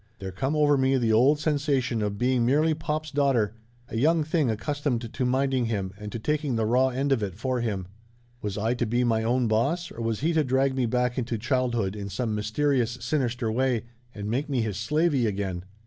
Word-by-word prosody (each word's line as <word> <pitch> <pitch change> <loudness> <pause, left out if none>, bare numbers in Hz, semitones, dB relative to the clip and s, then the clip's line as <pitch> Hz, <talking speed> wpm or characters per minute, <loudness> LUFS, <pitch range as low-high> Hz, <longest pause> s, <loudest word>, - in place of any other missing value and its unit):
There 95 -1 -6
come 135 +11 -2
over 145 -2 +4
me 130 0 +3
the 115 -3 +2
old 130 +7 +5
sensation 140 -6 0
of 105 -1 -2
being 125 +1 +2
merely 150 +6 +3
pop's 155 -1 -3
daugh 140 -1 +2
ter; 105 -4 +1 0.3
a 115 - -5
young 160 +6 +3
thing 155 -3 +1
accustomed 125 0 -2
to 130 - -1
minding 130 0 +1
him, 100 -4 -2
and 105 0 -8
to - - -4
taking 150 +2 -1
the 110 -1 +1
raw 125 +4 +3
end 135 +2 -1
of 130 -5 +2
it 95 -4 -3
for 125 +3 -1
him. 100 -6 -2 0.5
Was 105 -1 -3
I 110 +3 +1
to 120 -1 -1
be 120 +3 +1
my 115 -2 +2
own 120 +1 +1
boss 145 +11 0
or 115 - -7
was 115 0 -2
he 165 +3 +1
to 160 -1 +3
drag 130 0 +1
me 130 -2 +1
back 125 +2 0
into 120 -1 -2
childhood 120 -4 0
in 100 -1 -5
some 115 +1 -2
mysterious, 120 +3 0
sinister 125 -2 -1
way, 125 0 +1 0.3
and 105 -1 -5
make 135 +7 -1
me 130 -4 +1
his 105 -4 -2
slavey 140 +3 +1
again? 95 -3 -3
125 Hz, 215 wpm, -26 LUFS, 110-140 Hz, 0.5 s, old